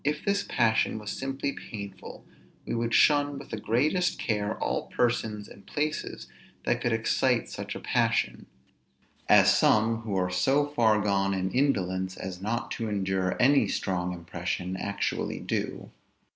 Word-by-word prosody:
If 150 +1 -1
this 200 -1 +1
passion 110 -2 +2
was 105 -1 -5
simply 135 +1 -3
painful, 100 -7 -9 0.4
we - - -3
would 115 0 -1
shun 145 0 +4
with 140 - -10
the 110 - -3
greatest 150 - +1
care 105 -1 -1
all - - -2
persons 110 -3 -1
and 100 - -14
places 150 +1 -3 0.4
that - - 0
could 120 - 0
excite 115 +2 +1
such - - -6
a - - -5
passion; - - 0 0.8
as - - +7
some, 110 +1 +3
who 110 -3 -4
are 90 -1 0
so 135 +11 +2
far 115 -7 +3
gone 100 -1 +1
in 95 0 -1
indolence 95 -9 0
as 95 -1 -6
not 115 +4 -2
to 115 -1 -3
endure 95 -2 -1
any 140 +3 +5
strong 90 -2 -1
impression, 90 +1 -4
actually 100 +2 -2
do. - - -3
110 Hz, 150 wpm, -28 LUFS, 95-130 Hz, 0.8 s, as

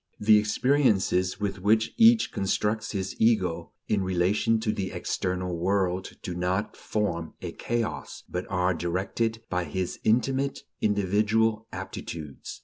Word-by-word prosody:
The 105 0 +6
"experiences" 105 -5 +2
with 100 -1 -2
which 110 +4 +2
each 225 0 +6
constructs 105 +2 -1
his 95 -2 -3
ego 90 -7 +1
in 100 -2 +1
relation 95 +5 +2
to 110 -1 +1
the 95 -3 -3
external 90 -1 -2
world 95 +1 -1
do 90 - -4
not 90 +4 -1
form 85 -7 -2
a - - -5
chaos, 120 -1 -3
but 90 - -4
are 90 -1 +1
directed 95 +7 -2
by 90 -1 -1
his 90 +4 -3
intimate 135 +5 +1 0.2
individual 110 +2 +2
aptitudes. 75 -5 -7
100 Hz, 130 wpm, -27 LUFS, 90-110 Hz, 0.2 s, The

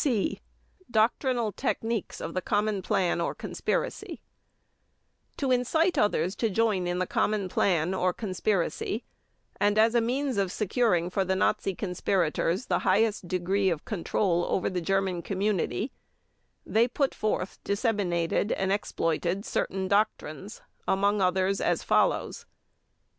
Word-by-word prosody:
(C) 240 -9 0 0.5
DOCTRINAL 235 0 +1
TECHNIQUES 225 -1 -2
OF 165 - -5
THE 185 - -1
COMMON 205 0 0
PLAN 175 -2 +1
OR - - -1
CONSPIRACY - - -3 1.2
To 270 -2 0
incite 320 +8 +2
others 200 - +1
to 225 - +1
join 205 -3 +1
in 175 0 -1
the 185 - 0
common 205 +1 0
plan 180 -1 +1
or 185 -1 +1
conspiracy, 200 +2 -1 0.6
and 205 +1 +2
as 225 +1 +5
a 235 - +4
means 260 +1 -1
of 195 -2 +1
securing 205 -5 +1
for 195 +1 +1
the 190 0 0
Nazi 195 0 +1
conspirators 180 - 0
the - - +1
highest 200 0 +1
degree 190 +2 +1
of 165 -4 -3
control 175 -2 0
over 190 - 0
the 180 -1 -2
German 190 0 0
community, 200 +5 -1 0.7
they 230 +2 +3
put 270 +2 0
forth, 210 -3 -2
disseminated, 200 -4 0
and 190 0 -1
exploited 180 -1 -1
certain 190 0 -1
doctrines, 200 -1 -1 0.3
among 200 +1 +2
others, 190 +1 +1
as - - +1
follows: - - +1
1. - - -45
195 Hz, 135 wpm, -28 LUFS, 185-220 Hz, 1.2 s, as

